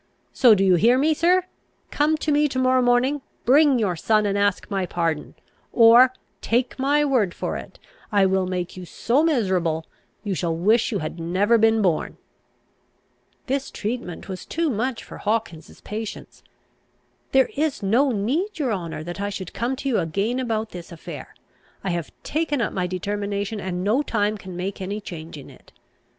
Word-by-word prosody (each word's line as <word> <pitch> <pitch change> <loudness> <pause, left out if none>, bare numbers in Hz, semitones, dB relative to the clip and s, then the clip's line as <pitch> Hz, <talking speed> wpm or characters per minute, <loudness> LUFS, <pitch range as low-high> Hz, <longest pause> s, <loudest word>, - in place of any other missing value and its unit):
So 240 -5 +6
do 195 - +1
you 185 -2 +5
hear, 240 +8 +4
sir? 355 +4 +3 0.5
come 305 +2 +2
to 305 - -1
me 295 +1 +3
to 260 - -5
morrow 255 0 +3
morning, 250 +4 +2 0.2
bring 280 +1 +5
your 200 -6 0
son, 215 +5 +2
and 200 -1 0
ask 200 -1 +1
my 195 -3 -2
pardon; 165 -4 -2 0.4
or, 235 +2 +7 0.3
take 245 +3 0
my 290 +2 +2
word 235 -11 +1
for - - -3
it, - - -8 0.3
I 200 -2 +4
will 190 -1 +1
make 180 -1 -3
you 185 - -8
so 240 - 0
miserable, 185 - +1 0.4
you 205 -3 -2
shall 165 -1 -1
wish 220 +8 +2
you 210 - 0
had 170 - -6
never 195 +7 +2
been 225 0 +3
born." 175 -5 0 1.3
This 270 +1 -2
treatment 215 -6 -5
was 190 -2 -6
too 330 -2 -1
much 240 +2 -2
for - - -11
Hawkins's 210 -7 -3
patience. 215 0 -7 0.9
"There 265 -2 +3
is 295 -6 -1
no 240 +8 +3
need, 280 - -1
your 265 -7 0
honour, 170 -5 -5
that 175 +4 -6
I 200 - -1
should 190 -3 -6
come 235 +6 -1
to 275 +1 -5
you 255 - +2
again 200 +10 -1
about 225 -3 -2
this 175 -1 -9
affair. 165 - -9 0.5
I 190 - -1
have 170 -2 -3
taken 305 -2 -1
up 230 - -1
my 180 -2 -1
determination, 200 +3 -3
and 180 -2 -3
no 220 +8 +2
time 210 -6 0
can 185 -2 -9
make 190 +2 -4
any 200 +3 -3
change 165 -5 -8
in 140 - -11
it. - - -19
215 Hz, 175 wpm, -23 LUFS, 185-255 Hz, 1.3 s, or